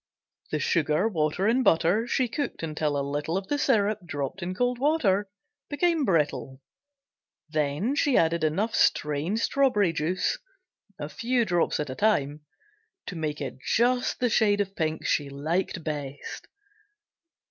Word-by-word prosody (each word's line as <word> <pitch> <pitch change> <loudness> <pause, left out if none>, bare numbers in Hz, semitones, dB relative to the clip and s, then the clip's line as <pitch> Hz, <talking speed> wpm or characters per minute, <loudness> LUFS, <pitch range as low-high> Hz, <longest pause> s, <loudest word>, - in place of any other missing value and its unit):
The 155 - -1
sugar, 155 +5 +1
water 165 -1 0
and 240 +4 +3
butter 180 +4 +3
she 255 0 +1
cooked 260 - -4
until 150 -2 -1
a 140 - -1
little 145 +4 -2
of 195 0 -5
the 290 - 0
syrup, 215 -6 +2
dropped 145 +3 -4
in 180 +2 -3
cold 245 +3 0
water, 215 -10 +2 0.4
became 325 0 +1
brittle, 140 - 0 0.9
then 155 - 0
she 285 -2 +2
added 165 0 +2
enough 195 +9 0
strained 150 +8 +1
strawberry 210 -12 +2
juice 180 - -1 0.6
(a 145 - -5
few 235 +8 0
drops 175 -4 +1
at 150 -3 -3
a - - -5
time) 150 -8 +1 0.6
to 185 - -6
make 155 -2 -3
it 130 -2 -5
just 245 +2 +1
the 245 - +2
shade 205 -2 +3
of 195 -1 -2
pink 160 -2 -2
she 145 -2 +1
liked 160 +5 -2
best. 145 -3 -6
175 Hz, 145 wpm, -27 LUFS, 150-225 Hz, 0.9 s, and